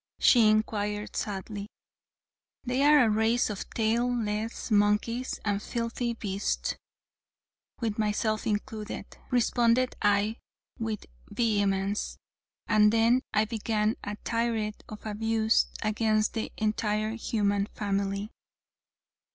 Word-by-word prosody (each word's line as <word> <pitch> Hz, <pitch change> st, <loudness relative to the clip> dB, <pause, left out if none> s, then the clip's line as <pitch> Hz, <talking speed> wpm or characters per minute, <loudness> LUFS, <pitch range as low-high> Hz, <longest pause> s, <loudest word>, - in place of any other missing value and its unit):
she 235 Hz, -4 st, +6 dB
inquired 210 Hz, -1 st, 0 dB
sadly. 205 Hz, 0 st, -4 dB, 1.0 s
"They 255 Hz, +1 st, 0 dB
are 295 Hz, -1 st, +7 dB
a -, -, +2 dB
race 220 Hz, +2 st, +2 dB
of 200 Hz, -, -6 dB
tail 230 Hz, +2 st, +1 dB
less 220 Hz, 0 st, -3 dB
monkeys 210 Hz, +4 st, +1 dB
and 205 Hz, -1 st, 0 dB
filthy 235 Hz, +1 st, -2 dB
beasts 200 Hz, -2 st, -2 dB, 1.1 s
with 220 Hz, -2 st, -2 dB
myself 215 Hz, +1 st, 0 dB
included," 210 Hz, -1 st, -3 dB, 0.2 s
responded 245 Hz, 0 st, +2 dB
I, 205 Hz, +2 st, +2 dB, 0.4 s
with 220 Hz, -2 st, -3 dB, 0.2 s
vehemence, 205 Hz, -3 st, 0 dB, 0.5 s
and 210 Hz, -1 st, +5 dB
then 230 Hz, +3 st, +4 dB
I 215 Hz, 0 st, +3 dB
began 215 Hz, -1 st, 0 dB
a 205 Hz, -, -4 dB
tirade 230 Hz, -2 st, -1 dB
of 215 Hz, 0 st, -9 dB
abuse 220 Hz, +1 st, +2 dB, 0.2 s
against 215 Hz, 0 st, +1 dB
the 225 Hz, -, -3 dB
entire 215 Hz, 0 st, 0 dB
human 205 Hz, -3 st, 0 dB
family. 200 Hz, +1 st, -2 dB
215 Hz, 105 wpm, -28 LUFS, 210-230 Hz, 1.1 s, are